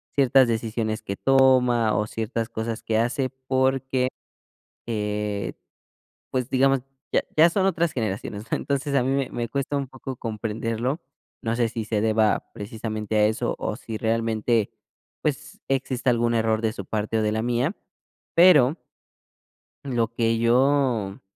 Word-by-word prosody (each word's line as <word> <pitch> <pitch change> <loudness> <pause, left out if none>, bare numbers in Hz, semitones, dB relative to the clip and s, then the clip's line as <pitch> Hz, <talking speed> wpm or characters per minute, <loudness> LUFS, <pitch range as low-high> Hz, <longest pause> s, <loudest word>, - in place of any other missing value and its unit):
ciertas 135 -2 +5
decisiones 110 -1 -2
que 100 - -4
toma 125 -4 +4
o 105 - +1
ciertas 115 +1 -3
cosas 110 0 -4
que 110 - 0
hace, 130 +3 0 0.2
porque, 130 -1 +1 0.8
eh, 105 -2 -2 0.8
pues, 130 -1 -1
digamos, 135 +1 +3 0.3
ya - - +3
ya 160 +2 +7
son 190 +2 +1
otras 170 -4 +1
generaciones, 110 -1 -4
¿no? - - +3
Entonces 140 0 -2
a 125 - +3
mí 130 - 0
me 135 -1 0
me 120 -1 -3
cuesta 140 +4 -2
un 140 -1 -3
poco 130 +1 -7
comprenderlo. 115 +4 -3 0.4
No 115 0 -1
sé 115 -1 +1
si 115 -2 -4
se 110 -2 0
deba 110 -1 +1
precisamente 110 0 -4
a 105 0 +5
eso 110 +1 0
o - - -3
si 110 - -6
realmente, 115 0 0 0.5
pues, - - -3
exista 130 -1 0
algún 120 -1 +2
error 110 -1 +1
de 110 -1 0
su 100 - -6
parte 110 +2 -2
o - - +2
de 105 0 +1
la 110 - -1
mía, 120 - 0 0.6
pero 155 -6 +7 1.1
lo 120 -4 0
que 115 -1 +1
yo, 120 -3 +2
115 Hz, 150 wpm, -24 LUFS, 110-130 Hz, 1.1 s, ya